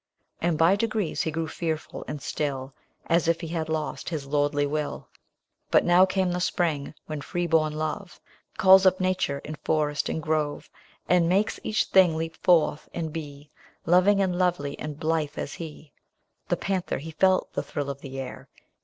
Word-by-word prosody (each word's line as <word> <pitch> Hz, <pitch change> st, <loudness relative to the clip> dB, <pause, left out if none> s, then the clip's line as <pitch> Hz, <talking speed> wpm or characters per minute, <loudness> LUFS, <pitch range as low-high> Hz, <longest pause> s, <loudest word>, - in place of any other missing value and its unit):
And 170 Hz, -1 st, +1 dB
by 165 Hz, +5 st, +5 dB
degrees 215 Hz, -5 st, -1 dB
he -, -, -1 dB
grew 160 Hz, +1 st, -2 dB
fearful 160 Hz, -1 st, -4 dB
and 150 Hz, -, -6 dB
still, 135 Hz, -3 st, -3 dB, 0.3 s
As 165 Hz, -1 st, +2 dB
if 165 Hz, +1 st, +2 dB
he 165 Hz, -, -5 dB
had 160 Hz, -1 st, -3 dB
lost 155 Hz, -1 st, -3 dB
his 155 Hz, -5 st, -4 dB
lordly 145 Hz, 0 st, +1 dB
will. 150 Hz, +1 st, -3 dB, 0.6 s
But -, -, +4 dB
now 180 Hz, +2 st, +6 dB
came 190 Hz, -1 st, 0 dB
the 180 Hz, -, -1 dB
spring, 165 Hz, -5 st, -1 dB
when 155 Hz, -2 st, -5 dB
free 175 Hz, +4 st, -2 dB
born 155 Hz, -2 st, +2 dB
love 155 Hz, +5 st, -4 dB, 0.4 s
Calls 190 Hz, -2 st, +7 dB
up 185 Hz, 0 st, +3 dB
nature 185 Hz, -6 st, 0 dB
in 155 Hz, 0 st, -6 dB
forest 150 Hz, -2 st, 0 dB
and -, -, -2 dB
grove. 155 Hz, -1 st, -2 dB, 0.4 s
And 175 Hz, -2 st, +3 dB
makes 200 Hz, +4 st, +1 dB
each 215 Hz, -, +1 dB
thing 180 Hz, -4 st, +4 dB
leap 165 Hz, 0 st, -3 dB
forth, 165 Hz, -4 st, +2 dB
and 160 Hz, -2 st, -3 dB
be 145 Hz, -2 st, -8 dB, 0.3 s
Loving, 185 Hz, +4 st, +4 dB
and 180 Hz, -1 st, -1 dB
lovely, 175 Hz, -6 st, 0 dB
and 150 Hz, -1 st, -6 dB
blithe 160 Hz, -2 st, -1 dB
as -, -, -4 dB
he. 155 Hz, -2 st, -9 dB, 0.6 s
The -, -, 0 dB
panther 190 Hz, -2 st, -2 dB
he 160 Hz, +3 st, -7 dB
felt 185 Hz, +4 st, +2 dB
the -, -, -1 dB
thrill 140 Hz, -1 st, -4 dB
of 140 Hz, 0 st, -9 dB
the 135 Hz, -1 st, -7 dB
air. 135 Hz, -, -7 dB
160 Hz, 180 wpm, -26 LUFS, 150-180 Hz, 0.6 s, Calls